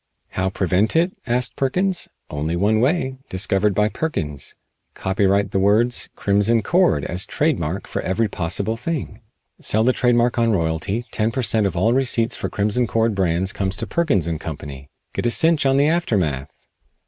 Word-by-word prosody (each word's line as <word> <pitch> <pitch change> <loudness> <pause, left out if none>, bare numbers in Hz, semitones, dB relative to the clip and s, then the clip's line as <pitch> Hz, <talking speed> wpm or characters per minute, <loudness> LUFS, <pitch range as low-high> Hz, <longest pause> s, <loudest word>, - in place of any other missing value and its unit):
"How 95 +1 -1
prevent 95 - +1
it?" 175 +3 +2
asked 125 +1 0
Perkins. 180 +7 0 0.2
"One 75 +1 -3
way - - -3
only, 130 - +1
discovered 95 +1 +1
by 105 +1 +3
Perkins. 75 - -4 0.4
Copyright 95 +1 +1
the 95 - 0
words 110 +5 +2
'Crimson 105 +3 +2
Cord' 180 0 +2
as 90 +1 -2
trade 155 -1 0
mark 85 +5 -3
for - - -4
every 105 +5 0
possible 100 +4 -2
thing. 125 -4 -4 0.4
Sell 110 +1 +2
the 130 +2 +3
trade 125 -1 +2
mark 120 0 +2
on 115 -1 +3
royalty; 90 +6 -1
ten 110 +1 0
per 130 +3 -2
cent. 110 -3 +2
of 90 -2 -4
all 110 +7 +3
receipts 120 -3 +1
for - - -4
'Crimson 105 +4 0
Cord' 115 +1 +1
brands 95 -1 0
comes 95 -1 -2
to - - -4
Perkins 140 - 0
& - - -16
Co. 80 -3 -5 0.6
Get - - -1
a - - +3
cinch 160 +3 +3
on 135 0 +3
the 140 - +4
aftermath!" 95 - -1
110 Hz, 175 wpm, -21 LUFS, 95-125 Hz, 0.6 s, the